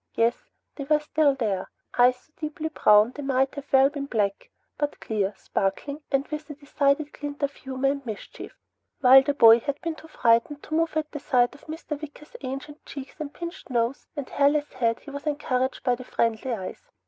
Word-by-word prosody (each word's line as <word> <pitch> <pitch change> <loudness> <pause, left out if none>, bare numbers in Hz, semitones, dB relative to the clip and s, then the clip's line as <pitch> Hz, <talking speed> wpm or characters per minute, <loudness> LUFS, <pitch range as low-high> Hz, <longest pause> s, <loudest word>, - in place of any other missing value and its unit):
Yes, 230 +1 +1 0.3
they 280 - -5
were 300 +1 +3
still 300 -1 +2
there. 210 -7 -2 0.3
Eyes 250 +1 +5
so 275 +5 -29
deeply 310 0 -4
brown 210 -6 +5
they 290 - -8
might 270 -1 +1 0.2
well 265 -1 +6
have 275 - +3
been 280 -2 -4
black, 205 -6 -1 0.3
but 290 -1 -2
clear, 205 -2 -1
sparkling, 280 +13 -2
and 275 0 +1
with 305 0 -5
a 295 - -6
decided 285 +1 0
glint 290 0 -6
of 280 0 0
humor 265 +1 -2
and 280 0 -5
mischief. 220 -5 -8 0.4
While 265 0 +9
the 280 +1 -1
boy 230 -3 +8
had 285 +3 -3
been 335 -1 -2
too 315 - -13
frightened 245 +1 +2
to - - -8
move 325 0 +1
at 305 -1 -2
the 295 - -5
sight 245 -3 +2
of 285 - -17
Mr. 310 -2 -6
Wicker's 300 0 -11
ancient 275 +3 -6
cheeks, 275 -1 -8 0.2
pinched 345 -1 -7
nose, 240 +1 -1
and 285 -3 -4
hairless 290 +1 +2
head, 230 -3 0
he 285 - -10
was 285 +2 -7
encouraged 260 -3 -1
by 250 - +3
the 250 +1 -5
friendly 230 0 -1
eyes. 225 - -6
275 Hz, 195 wpm, -26 LUFS, 245-295 Hz, 0.4 s, While